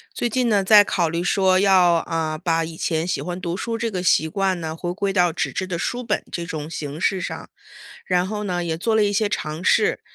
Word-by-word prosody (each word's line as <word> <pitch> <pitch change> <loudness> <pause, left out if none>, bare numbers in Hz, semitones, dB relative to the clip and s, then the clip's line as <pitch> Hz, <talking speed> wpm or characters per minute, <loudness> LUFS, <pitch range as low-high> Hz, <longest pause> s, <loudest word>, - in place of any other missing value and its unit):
最 240 - -1
近 245 0 0
呢， 205 -2 +3
在 205 +1 +7
考 175 -4 0
虑 170 +2 -2
说 185 0 +3
要， 185 -3 +5
啊， 160 -1 -2
把 165 0 0
以 160 0 -9
前 160 0 -1
喜 180 - -2
欢 180 +1 -5
读 175 -1 -3
书 230 +3 -3
这 230 0 -2
个 185 -3 -3
习 160 -3 +3
惯 190 +1 -1
呢， 160 0 -5
回 175 +1 -4
归 195 +2 -2
到 180 -3 +2
纸 165 - -2
质 185 - -2
的 180 -2 -4
书 245 +7 -3
本 215 -2 -1
这 170 - -4
种 155 -3 -5
形 150 -1 -6
式 190 +1 +1
上， - - -6 0.6
然 180 0 +1
后 210 +1 -4
呢 175 -3 -2
也 165 -1 -3
做 225 +6 0
了 220 -1 +4
一 205 - 0
些 210 +1 +1
尝 155 -5 -4
试。 435 - +2
180 Hz, 260 characters per minute, -22 LUFS, 165-205 Hz, 0.6 s, 在